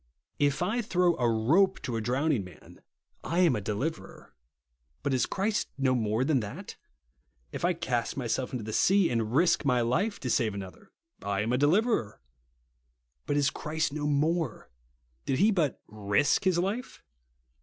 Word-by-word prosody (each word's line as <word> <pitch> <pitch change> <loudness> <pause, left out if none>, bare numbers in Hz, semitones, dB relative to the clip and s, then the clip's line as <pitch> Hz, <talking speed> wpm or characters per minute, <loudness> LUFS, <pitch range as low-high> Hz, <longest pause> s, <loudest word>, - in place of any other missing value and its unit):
If 145 +2 +1
I 220 +7 0
throw 180 -5 +2
a 120 -2 +2
rope 160 - +3
to 120 - -3
a 115 - -1
drowning 130 +1 0
man, 90 - -15 0.4
I 170 +2 0
am 165 -8 +4
a 105 - -3
deliverer. 120 +11 -5 0.7
But 140 - 0
is 130 - +1
Christ 205 +2 -1
no 135 -2 +2
more 110 -1 0
than 140 -1 +2
that? 105 -3 -7 0.8
If - - -6
I 175 +1 +3
cast 125 -8 -2
my 130 - -3
self 125 +3 -2
into 125 -5 -4
the 110 +1 -6
sea, 195 - +3
and 115 0 -1
risk 170 +1 +3
my 125 -4 +2
life 195 - 0
to 130 - -3
save 110 -3 +1
another, 100 - -9 0.3
I 100 -1 -1
am 115 +3 -1
a - - +2
deliverer. 155 - +1 1.1
But 145 - 0
is 140 -1 +2
Christ 155 -1 -2
no 150 -1 -2
more? 150 -2 -1 0.6
Did 135 - +1
he 210 +4 +4
but 165 -9 0
risk 105 - +1
his 185 -2 +3
life 205 +8 -3
140 Hz, 170 wpm, -28 LUFS, 115-175 Hz, 1.1 s, am